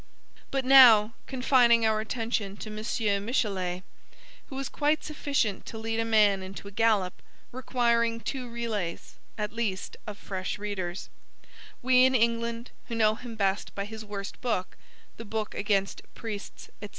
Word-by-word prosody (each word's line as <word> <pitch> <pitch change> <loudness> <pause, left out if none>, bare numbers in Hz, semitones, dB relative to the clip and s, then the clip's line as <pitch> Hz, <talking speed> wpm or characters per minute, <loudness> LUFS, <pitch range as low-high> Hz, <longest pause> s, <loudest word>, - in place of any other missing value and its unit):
But 270 -1 -1
now, 235 -5 +8
confining 250 -3 +4
our 220 -1 +2
attention 220 -3 -3
to 215 - -7
M. 215 -2 -1
Michelet 190 -6 -1 0.6
who 265 - -8
is 270 -1 -3
quite 300 +1 0
sufficient 280 -9 -1
to 225 - -7
lead 225 0 -2
a 225 - +1
man 210 -3 +4
into 190 +1 -8
a - - -9
gallop, 205 -4 +1 0.3
requiring 235 -2 +1
two 250 +1 -5
relays, 220 -7 -4 0.2
at 210 -1 -3
least, 215 -5 -3
of 210 -1 -6
fresh 190 -2 -4
readers, 190 -4 -4 0.7
we 255 0 +5
in 260 0 +4
England 235 0 0 0.2
who 235 - -4
know 215 -1 +4
him 235 +1 -8
best 195 -1 -1
by 200 - -3
his 220 +1 -8
worst 200 -2 -7
book, 205 -7 -2 0.4
the 230 - -7
book 215 0 -3
against 200 -1 0
Priests, 215 -3 -7
&c. 205 - -7
220 Hz, 150 wpm, -28 LUFS, 200-235 Hz, 0.7 s, now